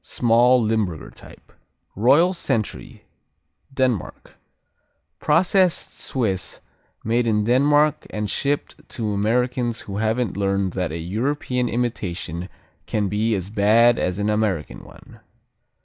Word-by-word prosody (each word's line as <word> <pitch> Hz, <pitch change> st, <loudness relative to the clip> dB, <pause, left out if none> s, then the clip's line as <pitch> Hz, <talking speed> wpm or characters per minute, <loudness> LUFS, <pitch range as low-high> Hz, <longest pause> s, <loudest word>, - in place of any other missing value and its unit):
Small, 120 Hz, +2 st, +3 dB
Limburger 110 Hz, -8 st, -1 dB
type. -, -, -16 dB, 0.4 s
Royal 145 Hz, -, +4 dB
Sentry 115 Hz, -, -4 dB, 0.7 s
Denmark 130 Hz, -7 st, -2 dB, 0.9 s
Processed 180 Hz, +3 st, +2 dB
Swiss 105 Hz, -8 st, -2 dB, 0.4 s
made 115 Hz, +2 st, +1 dB
in 105 Hz, -2 st, +2 dB
Denmark 145 Hz, +6 st, +2 dB
and 105 Hz, 0 st, -3 dB
shipped 140 Hz, +7 st, -3 dB
to 110 Hz, -3 st, -3 dB
Americans 120 Hz, +3 st, 0 dB
who 100 Hz, -1 st, -7 dB
haven't 110 Hz, +2 st, 0 dB
yet 90 Hz, -, -10 dB
learned 100 Hz, -2 st, 0 dB
that 90 Hz, -4 st, -2 dB
a 80 Hz, -, -4 dB
European 125 Hz, -, -2 dB
imitation 95 Hz, -7 st, -3 dB, 0.4 s
can 105 Hz, -2 st, -1 dB
be 110 Hz, +3 st, 0 dB
as 95 Hz, +1 st, -5 dB
bad 110 Hz, +3 st, +4 dB
as 90 Hz, 0 st, -1 dB
an 105 Hz, +1 st, 0 dB
American 95 Hz, -, -2 dB
one. -, -, -16 dB
110 Hz, 115 wpm, -22 LUFS, 100-125 Hz, 0.9 s, Royal